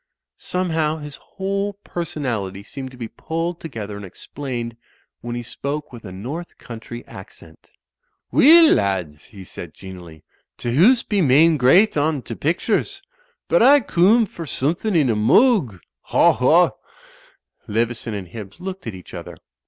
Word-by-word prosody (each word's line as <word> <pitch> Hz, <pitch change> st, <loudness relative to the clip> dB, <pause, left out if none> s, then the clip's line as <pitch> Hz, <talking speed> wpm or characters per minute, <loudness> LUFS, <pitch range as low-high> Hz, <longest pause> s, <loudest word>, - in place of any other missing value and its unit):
Somehow 160 Hz, -4 st, -1 dB
his 150 Hz, -2 st, -9 dB
whole 195 Hz, +1 st, -3 dB
personality 130 Hz, -, -4 dB
seemed 130 Hz, +5 st, -7 dB
to 130 Hz, -, -15 dB
be 120 Hz, -2 st, -5 dB
pulled 165 Hz, +7 st, -4 dB
together 110 Hz, -10 st, -7 dB
and 100 Hz, -, -8 dB
explained 120 Hz, +4 st, -6 dB, 0.4 s
when 120 Hz, +1 st, -6 dB
he 120 Hz, -, -4 dB
spoke 140 Hz, +4 st, -5 dB
with 115 Hz, -2 st, -11 dB
a 95 Hz, -, -8 dB
North 135 Hz, -, -7 dB
Country 120 Hz, +1 st, -9 dB
accent. 80 Hz, -4 st, -14 dB, 0.6 s
"Weel, 325 Hz, +3 st, +7 dB
lards," 90 Hz, -7 st, -1 dB
he 100 Hz, -3 st, -12 dB
said, 85 Hz, -3 st, -9 dB
genially, 90 Hz, -5 st, -11 dB, 0.3 s
"t'hoose 180 Hz, -, +3 dB
be 205 Hz, -3 st, +1 dB
main 155 Hz, +3 st, +5 dB
great 155 Hz, -, +4 dB
on 145 Hz, -2 st, 0 dB
t'pictures. 220 Hz, -, -2 dB, 0.4 s
But -, -, +3 dB
I 285 Hz, +1 st, +7 dB
coom 220 Hz, +1 st, +3 dB
for 170 Hz, -4 st, -9 dB
suthin' 165 Hz, +10 st, -1 dB
in 150 Hz, -5 st, +4 dB
a -, -, 0 dB
moog. 130 Hz, -, +3 dB, 0.3 s
Haw! -, -, +4 dB
Haw!" -, -, +4 dB, 1.0 s
Leveson 115 Hz, 0 st, -2 dB
and 95 Hz, -4 st, -6 dB
Hibbs 105 Hz, -, -10 dB
looked 190 Hz, -4 st, -7 dB
at 110 Hz, -, -5 dB
each 90 Hz, -, -13 dB
other. -, -, -8 dB
140 Hz, 145 wpm, -21 LUFS, 105-175 Hz, 1.0 s, Weel